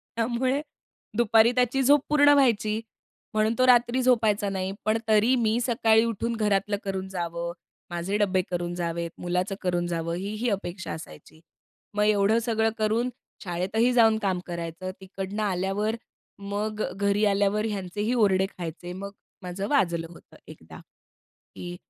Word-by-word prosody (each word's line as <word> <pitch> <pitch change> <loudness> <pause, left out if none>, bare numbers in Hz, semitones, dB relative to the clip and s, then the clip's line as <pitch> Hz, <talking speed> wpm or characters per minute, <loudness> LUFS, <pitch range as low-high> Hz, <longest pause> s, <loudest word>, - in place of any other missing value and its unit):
त्यामुळे 250 +4 0 0.6
दुपारी 230 0 +5
त्याची 250 +1 +2
झोप 285 +2 +5
पूर्ण 290 -1 +5
व्हायची. 225 -6 +2 0.5
म्हणून 215 +1 +2
तो 255 - +4
रात्री 245 +1 +4
झोपायचा 220 -5 +2
नाही. 190 -1 -2
पण 215 +1 +2
तरी 220 +4 +4
मी 230 -1 +1
सकाळी 225 -2 +3
उठून 230 +1 -2
घरातलं 210 -1 +1
करून 190 -1 -3
जावं. 170 -2 -4 0.4
माझे 175 +4 -2
डब्बे 190 -3 +2
करून 175 0 -2
जावेत. 170 -1 -3
मुलाचं 180 +3 -1
करून 175 -2 0
जावं. 170 -1 -2
ही, 195 +3 -4
ही 240 +3 -1
अपेक्षा 190 -3 -4
असायची. 155 0 -11 0.5
मग 210 0 +1
एवढं 210 +1 +3
सगळं 225 -1 +2
करून 220 +3 +1 0.3
शाळेतही 195 +6 0
जाऊन 225 -2 +5
काम 185 -2 +1
करायचं. 170 +1 -5
तिकडनं 195 +2 -5
आल्यावर 200 +3 -1 0.6
मग 215 +1 -2
अ, - - -3
घरी 200 +1 +2
आल्यावर 205 +2 +1
ह्यांचेही 205 +4 -2
ओरडे 195 -5 +3
खायचे. 175 +1 -6
मग 200 +2 -7 0.3
माझं 180 +2 -4
वाजलं 170 - +1
होतं 170 - -16
एकदा - - -12 0.8
की 175 0 -7
205 Hz, 145 wpm, -26 LUFS, 180-225 Hz, 0.8 s, दुपारी